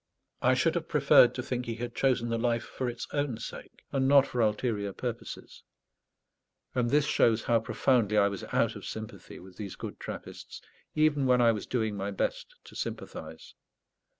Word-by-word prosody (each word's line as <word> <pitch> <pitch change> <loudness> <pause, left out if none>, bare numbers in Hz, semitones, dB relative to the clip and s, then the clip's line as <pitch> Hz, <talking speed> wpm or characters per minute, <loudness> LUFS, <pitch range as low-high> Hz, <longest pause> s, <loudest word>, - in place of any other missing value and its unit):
I - - +4
should - - +2
have - - -2
preferred - - +5
to - - -3
think 125 -1 -3
he 115 - -2
had 120 +1 -5
chosen 125 -3 +1
the 115 0 -1
life 120 0 +1
for 130 -2 -4
its 120 0 -6
own 145 -5 -1
sake, 115 - -9
and 135 -1 +1
not 140 0 +7
for 125 -3 -2
ulterior 105 -2 0
purposes; 120 +1 -6 1.1
and 125 -2 +1
this 145 +2 +3
shows 115 -6 +3
how 115 -1 +3
profoundly 115 -2 +1
I 100 -1 +5
was 100 -2 -5
out 115 -1 +1
of 105 - -9
sympathy 110 -4 -8
with 90 0 -14
these 100 -3 -6
good - - -7
Trappists, - - -8 0.4
even 150 -3 +3
when 125 -1 +4
I 120 -1 +6
was 105 -3 -4
doing 110 -4 -1
my 100 0 -3
best - - -3
to - - -14
sympathize. 480 0 -7
120 Hz, 180 wpm, -29 LUFS, 110-130 Hz, 1.1 s, not